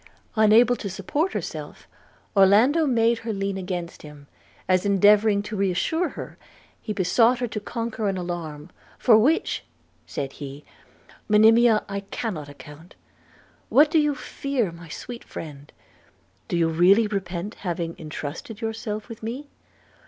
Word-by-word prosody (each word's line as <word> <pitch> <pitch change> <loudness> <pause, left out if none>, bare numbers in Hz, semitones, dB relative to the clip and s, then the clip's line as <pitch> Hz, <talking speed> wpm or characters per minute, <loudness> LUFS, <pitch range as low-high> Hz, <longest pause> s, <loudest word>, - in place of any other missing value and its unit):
Unable 220 +3 +5
to 200 - -5
support 290 - -2
herself, - - -6 0.5
Orlando 225 - +5
made 230 -2 +2
her 230 0 -4
lean 195 -1 -2
against 180 -2 -5
him, 150 -1 -12 0.4
as 185 -1 +3
endeavouring 205 +1 +4
to 210 +1 -6
re 195 -1 +1
assure 320 - 0
her, - - -9 0.4
he 215 - -5
besought 215 +6 +3
her 245 - -1
to 220 -2 -4
conquer 225 -1 -3
an 190 - -2
alarm, 170 -3 -6 0.3
'for 235 - +5
which,' 295 +9 +1 0.4
said 135 -1 -4
he, 140 0 -9 0.6
'Monimia, 220 +1 +5
I 200 - -3
cannot 195 -7 -5
account. 150 +4 -13 0.7
What 295 +2 +5
do 320 - +4
you 295 -1 +1
fear, 255 -5 -2
my 170 0 -12
sweet 240 +8 -8
friend? 145 -3 -9 0.8
Do 175 - -1
you 165 -1 +2
already 180 +7 +5
repent 195 -1 -4
having 170 -3 -3
entrusted 155 +7 -7
yourself 220 -2 -4
with 230 -2 -10
me?' 255 +6 -6
205 Hz, 140 wpm, -24 LUFS, 175-230 Hz, 0.8 s, Unable